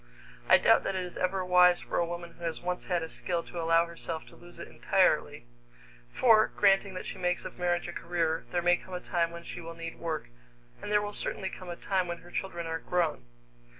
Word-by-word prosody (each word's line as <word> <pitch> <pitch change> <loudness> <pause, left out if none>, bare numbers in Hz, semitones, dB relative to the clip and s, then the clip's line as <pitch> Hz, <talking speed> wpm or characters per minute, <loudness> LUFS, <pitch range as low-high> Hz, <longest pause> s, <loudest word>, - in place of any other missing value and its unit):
I - - +9
doubt - - +4
that 195 - -1
it 185 -1 -2
is 180 - -9
ever 185 0 -1
wise 180 -1 +6
for - - -2
a 170 - +2
woman 170 0 -6
who 170 - -14
has 165 -1 -2
once 180 0 -3
had 175 -3 0
a - - -4
skill 170 0 -2
to 175 - -6
allow 165 +1 +4
herself 170 -1 -5
to - - -16
lose 175 0 -15
it - - -8
entirely, - - +1 0.7
for, 220 -3 +5
granting 195 -1 +2
that 185 - -5
she - - -6
makes 180 0 0
of - - -8
marriage 175 -1 0
a 175 - -6
career, 165 -2 -1
there 175 -1 -1
may 175 0 +4
come 185 - -9
a - - -3
time 170 -1 0
when 170 0 -9
she 175 - -7
will 165 0 -8
need 165 0 -7
work, 160 - -3 0.5
and - - -5
there 210 0 +3
will 205 0 -4
certainly 190 - -2
come 185 -1 -9
a 175 - -4
time 185 0 -1
when 170 0 -4
her 175 0 -15
children 175 -3 -4
are 165 0 -3
grown. 165 - -1
175 Hz, 235 wpm, -29 LUFS, 170-180 Hz, 0.7 s, I